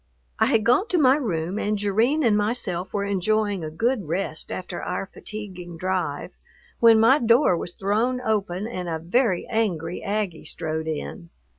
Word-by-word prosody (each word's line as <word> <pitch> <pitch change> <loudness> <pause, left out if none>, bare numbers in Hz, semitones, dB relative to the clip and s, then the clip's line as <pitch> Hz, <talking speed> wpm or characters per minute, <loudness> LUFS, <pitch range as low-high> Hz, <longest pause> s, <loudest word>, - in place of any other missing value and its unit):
I 220 - +4
had 225 -5 +2
gone 250 - +3
to 365 - +1
my 265 -4 +5
room, 190 - -2
and 210 0 0
Jerrine 220 +10 +1
and 225 -4 +4
myself 205 -4 -1
were 200 - -1
enjoying 200 0 0
a 155 - -4
good 220 +4 -1
rest 170 -1 -2
after 180 -1 -5
our - - -3
fatiguing 185 -4 -8
drive, 180 -5 -2 0.4
when 230 -1 +7
my 245 +6 +5
door 235 -3 +4
was 170 +1 -4
thrown 220 +6 0
open 205 -5 -1
and 185 -7 -4
a 165 - -1
very 180 +3 +1
angry 180 -7 -1
Aggie 200 -5 -3
strode 160 0 -4
in. 85 - -5
200 Hz, 165 wpm, -24 LUFS, 175-225 Hz, 0.4 s, when